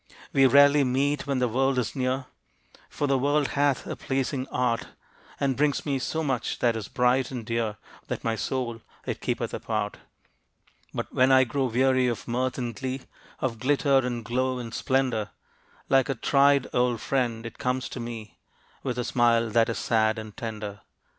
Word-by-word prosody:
We 135 -1 +6
rarely 140 +1 +6
meet 140 +3 0
when 140 -1 0
the 125 -1 +2
World 135 +3 +1
is 125 - -1
near, 130 0 -1 0.6
For 145 - -2
the 135 -2 +2
World 145 +1 +2
hath 145 -1 +1
a - - -4
pleasing 135 0 -2
art 120 -3 0 0.5
And 135 -2 +1
brings 145 -2 +1
me 140 -3 0
so 160 +5 -2
much 130 -5 -1
that 120 -2 +2
is 110 -3 -4
bright 125 +1 +2
and 125 -4 -6
dear 115 -2 -1 0.3
That - - -4
my 115 -1 0
Soul 120 0 -3 0.2
it - - -4
keepeth - - -2
apart. - - -2 0.9
But - - -5
when 130 +1 +4
I 130 0 +7
grow 135 +2 -1
weary 130 +1 +3
of 120 -3 -3
mirth 125 +2 -1
and 120 -3 -3
glee, 130 +3 -4 0.4
Of 115 -4 -2
glitter, 140 +1 +3
and 120 -3 -3
glow, 130 +2 0
and 115 -2 -6
splendor, 125 -6 0 0.6
Like 135 0 +3
a 135 - 0
tried 140 +2 +4
old 125 -2 +2
friend 120 -4 -1
it 115 - -8
comes 125 -1 -1
to - - -6
me, 115 -2 -7 0.4
With 125 -2 -3
a 125 - 0
smile 115 -2 +2
that 115 +1 +3
is 115 - -2
sad 110 -1 +2
and 110 -1 -8
tender. 105 -3 -6
125 Hz, 180 wpm, -26 LUFS, 115-135 Hz, 0.9 s, I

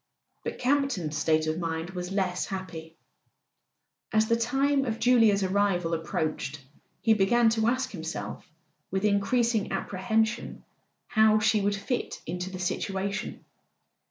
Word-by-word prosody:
But - - -4
Campton's 255 - 0
state 155 0 +2
of 155 +1 -1
mind 165 +1 -3
was 180 0 -5
less 185 -2 -1
happy. 165 -4 -7 1.2
As 215 0 +3
the 230 - +3
time 270 +4 +1
of 225 -4 -2
Julia's 225 -5 +4
arrival 190 -3 +1
approached 155 -3 -2 0.4
he 225 - +5
began 225 +3 +4
to 225 0 +1
ask 255 +2 0
himself 165 -4 -5 0.5
with 190 +2 -1
increasing 220 +2 +1
apprehension 220 +4 -1 0.4
how 220 -1 +4
she 215 0 +3
would 200 +1 +1
fit 205 +5 -3
into 180 +3 -4
the 185 - -7
situation. 195 +2 -3
200 Hz, 130 wpm, -28 LUFS, 180-225 Hz, 1.2 s, he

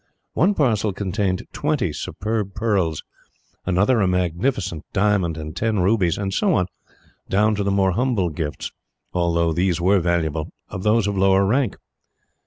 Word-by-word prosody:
One 195 +5 +3
parcel 110 - +1
contained 95 -1 -1
twenty - - 0
superb 105 -1 -3
pearls, 100 -8 0 0.6
another 100 +6 +3
a 95 - +3
magnificent 90 - -1
diamond 100 -5 +1
and 75 -1 -6
ten 110 -1 0
rubies, 95 -2 +2
and 95 -1 -3
so 195 - +2
on, 90 - +2 0.6
down 105 +2 +3
to 105 -1 -1
the 100 - 0
more 95 -1 +2
humble 110 -3 +1
gifts 75 -2 -4 0.4
although 85 -2 +1
these 90 +1 +1
were 95 +3 +3
valuable 80 -3 -1 0.2
of 95 - -5
those 105 +1 +3
of 100 0 -1
lower 95 0 +4
rank. 125 +2 +1
95 Hz, 150 wpm, -22 LUFS, 85-105 Hz, 0.6 s, lower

